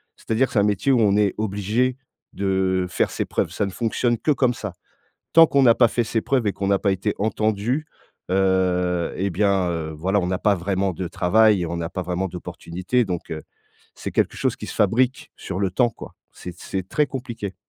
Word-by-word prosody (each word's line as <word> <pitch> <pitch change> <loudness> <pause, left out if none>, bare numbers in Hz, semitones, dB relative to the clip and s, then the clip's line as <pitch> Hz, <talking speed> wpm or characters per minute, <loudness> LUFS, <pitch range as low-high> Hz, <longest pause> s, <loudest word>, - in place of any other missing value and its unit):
C'est-à-dire 115 +4 0
c'est 105 - +2
un - - +4
métier 105 +6 +1
où 125 - +4
on 100 -2 +3
est 105 -3 +2
obligé 110 +5 0 0.4
de 95 -1 0
faire - - 0
ses - - -2
preuves, - - -1
ça 105 - -1
ne 100 - -4
fonctionne 120 +2 0
que 150 - 0
comme 130 -3 +2
ça. 105 -6 -6 0.6
Tant 165 0 +8
qu'on 140 -2 +2
n'a 115 -3 +6
pas 120 - +6
fait 120 - 0
ses 115 0 -1
preuves 130 -3 0
et - - 0
qu'on 100 - -4
n'a 100 -1 +3
pas 100 - +2
été 95 - -1
entendu, 110 +7 0 0.4
heu 90 -2 +1
et 100 +1 -1
bien, 95 -1 +1
heu, 80 -2 -3
voilà, 95 +6 0
on 90 - -2
n'a 90 +1 -1
pas 105 -2 +3
vraiment 95 +1 -1
de 90 +2 -4
travail, 100 +2 +3
on 85 +1 -3
n'a 85 -1 -3
pas 95 - -3
vraiment 90 +2 -2
d'opportunités, 90 +6 -2
donc 90 -4 -5
heu, 80 -1 -5 0.5
c'est - - -6
quelque - - 0
chose - - 0
qui - - -8
se - - -7
fabrique 125 +6 +1
sur 95 +1 -5
le 95 -2 +1
temps, 120 +5 +2
quoi. - - -11 0.2
C'est 90 - -8
c'est 95 -2 -4
très 150 -1 +1
compliqué. 120 -7 -6
100 Hz, 215 wpm, -23 LUFS, 90-115 Hz, 0.6 s, Tant